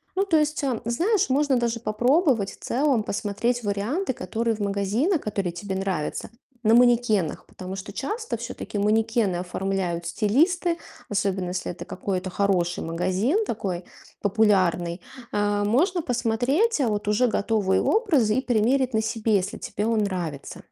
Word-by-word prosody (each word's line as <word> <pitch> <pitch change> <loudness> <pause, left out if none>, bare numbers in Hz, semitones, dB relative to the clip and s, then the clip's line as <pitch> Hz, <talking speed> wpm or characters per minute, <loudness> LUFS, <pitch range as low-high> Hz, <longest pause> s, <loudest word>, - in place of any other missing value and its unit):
Ну, 390 - +2
то 330 -5 +3
есть, 300 -1 0
а, 255 -5 0
знаешь, 345 - +1
можно 275 -1 +2
даже 235 -1 -1
попробовать 240 - +2
в - - -16
целом 265 -4 +1
посмотреть 220 +4 -1
варианты, 235 - -1
которые 225 +5 -2
в - - -12
магазинах, 205 - +1
которые 195 -4 -2
тебе 190 +3 -5
нравятся, 190 -5 -2 0.3
на 220 +1 +4
манекенах, 235 -8 +3
потому 185 +1 -8
что 195 +1 -7
часто 440 - -3
всё-таки 205 - -6
манекены 215 -2 +2
оформляют 180 -1 -2
стилисты, 335 - +2 0.3
особенно 195 -3 -1
если 180 0 -3
это 175 - -8
какой-то 185 0 -3
хороший 180 -3 0
магазин, 190 - 0
такой 185 -5 -3 0.4
популярный. 185 -4 +2 0.3
Э, 205 0 +1
можно 330 - +2
посмотреть 255 - +1
вот 210 -4 -1
уже 215 +4 +3
готовые 205 -3 +1
образы 295 - +2
и 260 - +2
примерить 250 +2 +1
на 220 - +2
себе, 220 -1 +1
если 190 +2 -3
тебе 210 +2 -3
он 225 -1 +2
нравится. 175 -8 -4
215 Hz, 145 wpm, -25 LUFS, 195-255 Hz, 0.4 s, на